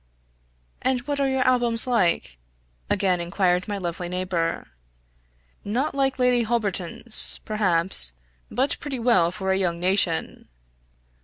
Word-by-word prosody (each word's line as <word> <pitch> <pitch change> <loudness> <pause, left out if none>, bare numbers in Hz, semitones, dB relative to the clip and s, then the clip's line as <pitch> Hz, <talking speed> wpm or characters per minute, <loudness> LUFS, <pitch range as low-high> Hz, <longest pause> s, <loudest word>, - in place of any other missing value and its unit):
"And 260 -1 -1
what 285 +2 -4
are 275 - +1
your 265 -1 0
albums 240 -2 +3
like?" 175 - -1 0.5
again 185 -3 0
inquired 180 +1 -1
my 205 -1 -4
lovely 175 -1 -6
neighbor. 180 -2 -3 0.9
"Not 245 +9 -3
like 270 -1 -1
Lady 250 -1 +2
Holberton's, 215 -2 +4
perhaps 185 - -1 0.4
but 265 +3 -2
pretty 280 -3 -5
well 230 -8 +2
for 190 +1 -4
a 190 - +1
young 170 -3 -2
nation." 180 -2 -1
200 Hz, 125 wpm, -23 LUFS, 180-250 Hz, 0.9 s, Holberton's